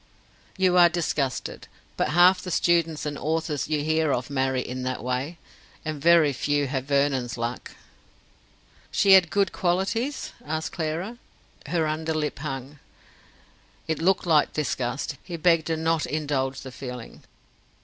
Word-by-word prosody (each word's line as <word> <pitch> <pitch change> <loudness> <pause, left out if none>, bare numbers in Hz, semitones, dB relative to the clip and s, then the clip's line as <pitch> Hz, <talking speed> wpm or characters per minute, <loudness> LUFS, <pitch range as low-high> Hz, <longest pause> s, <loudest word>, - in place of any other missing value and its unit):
"You 185 -1 +3
are 175 -1 +8
disgusted. 155 -6 -2 0.3
But - - 0
half 180 +3 +5
the 180 - -6
students 165 -3 +1
and 145 -1 -4
authors 155 -2 -1
you 150 -2 0
hear 155 -1 +1
of 130 +2 -2
marry 130 -1 0
in 130 +1 -5
that 130 -1 -3
way. 130 +7 -2 0.5
And 155 -2 -4
very 165 -2 +5
few 145 +2 0
have 135 -1 -3
Vernon's 140 -3 0
luck." 120 +1 -4 1.2
"She 195 - +3
had 190 -3 +7
good 200 +1 +1
qualities?" 195 +10 -1
asked 160 +1 -3
Clara. 170 +8 -3 0.5
Her 165 -2 +1
under 155 +1 -2
lip 150 -2 -2
hung. 135 -1 -6 1.1
It 160 0 -2
looked 190 +3 +2
like 155 -4 +3
disgust; 135 -2 -2
he 175 -2 -6
begged 165 -1 +3
her 165 -1 0
not 160 0 0
indulge 140 -3 -2
the 130 - -8
feeling. 125 -2 -8
155 Hz, 145 wpm, -25 LUFS, 135-170 Hz, 1.2 s, are